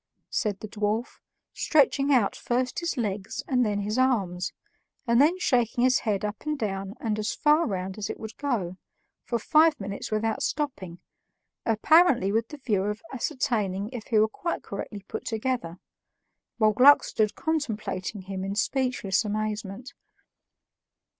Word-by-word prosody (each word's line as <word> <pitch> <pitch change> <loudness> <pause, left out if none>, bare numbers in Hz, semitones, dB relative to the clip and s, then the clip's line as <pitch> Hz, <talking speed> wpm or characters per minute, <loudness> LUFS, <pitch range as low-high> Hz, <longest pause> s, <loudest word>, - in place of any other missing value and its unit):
said 205 -4 -1
the 215 - -5
dwarf, 215 +3 -2 0.3
stretching 285 -1 +3
out 240 -7 +3
first 250 +1 -1
his 340 -4 -2
legs 205 -4 -3
and 250 -2 +2
then 205 -2 0
his 210 +4 -1
arms, 195 -9 +1 0.5
and 235 +1 +4
then 325 +6 +4
shaking 245 - +1
his 255 0 +4
head 210 -2 -1
up 210 0 -4
and 305 -1 -2
down 195 -3 -3
and 215 -2 -2
as 215 - -1
far 305 +3 +3
round 190 -1 -4
as 200 - -3
it - - -5
would 220 0 -8
go, 210 -11 -2 0.5
for 235 - 0
five 310 +6 +4
minutes 200 0 -5
without 220 +1 -1
stopping, 225 - -3 0.7
apparently 240 - +4
with 225 +2 +1
the 300 - -9
view 220 -8 0
of 210 +1 -3
ascertaining 220 -8 -1
if 240 -3 -7
he 225 - +2
were 215 +1 +5
quite 335 +10 -4
correctly 205 -2 -7
put - - -5
together, 225 -7 -2 0.8
while 215 -2 +4
Gluck 270 +6 +7
stood 215 -1 0
contemplating 215 - -3
him 190 0 -5
in 195 +1 -3
speechless 240 -3 0
amazement. 215 +2 -4
220 Hz, 155 wpm, -27 LUFS, 200-255 Hz, 0.8 s, Gluck